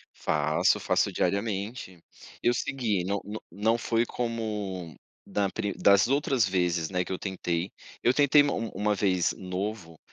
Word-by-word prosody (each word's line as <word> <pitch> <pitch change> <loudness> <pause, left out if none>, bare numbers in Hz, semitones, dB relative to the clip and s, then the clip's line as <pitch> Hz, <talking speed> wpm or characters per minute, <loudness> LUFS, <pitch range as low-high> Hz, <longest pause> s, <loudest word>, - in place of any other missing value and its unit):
Faço, 75 0 +2
faço - - +1
diariamente. 100 -2 -2 0.4
Eu 120 - +4
segui, 120 -8 -1
n 100 +2 -1
n 105 +2 -6
não 110 +3 +1
foi 115 0 +1
como 105 -8 -4 0.3
da 100 -1 0
pri 100 -1 -2
das 100 +1 +5
outras 135 -5 +2
vezes, 90 -3 0
né, 90 -1 0
que - - -6
eu 95 - -2
tentei. 90 -2 -3 0.3
Eu 120 - +4
tentei 145 +1 +5
ma 145 - 0
uma 105 -2 -1
vez 95 -3 +1
novo, 90 -2 -5
100 Hz, 150 wpm, -28 LUFS, 90-115 Hz, 0.4 s, das